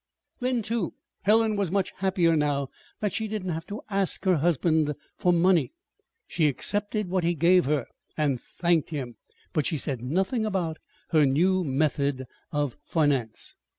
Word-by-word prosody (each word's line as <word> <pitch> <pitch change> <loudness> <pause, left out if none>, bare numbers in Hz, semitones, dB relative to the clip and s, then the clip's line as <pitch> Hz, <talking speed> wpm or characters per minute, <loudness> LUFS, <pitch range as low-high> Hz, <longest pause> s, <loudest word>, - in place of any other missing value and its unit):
Then, 250 -2 0
too, 220 -4 -2 0.3
Helen 220 +1 +3
was 200 -3 0
much 195 +1 0
happier 180 -3 +2
now 145 -3 0 0.3
that 210 -3 0
she 220 - -1
did 210 -3 -4
not 180 - -1
have 160 +1 -5
to 205 - -6
ask 195 0 0
her 185 -3 +4
husband 155 -1 +2 0.2
for 180 - +3
money. 175 - +3 0.5
She 160 -3 +1
accepted 205 - -1
what 185 0 0
he 170 +1 +1
gave 175 +3 +4
her, 145 -2 0 0.3
and 140 -5 +1
thanked 170 -3 0
him; 130 -7 -5 0.4
but 155 -5 +1
she 160 - -1
said 135 -4 -2
nothing 190 - 0
about 180 -7 -1 0.3
her 155 -2 +5
new 180 +7 +2
method 140 -2 0 0.3
of 145 -4 -1
finance. 140 -8 0
170 Hz, 160 wpm, -26 LUFS, 145-190 Hz, 0.5 s, her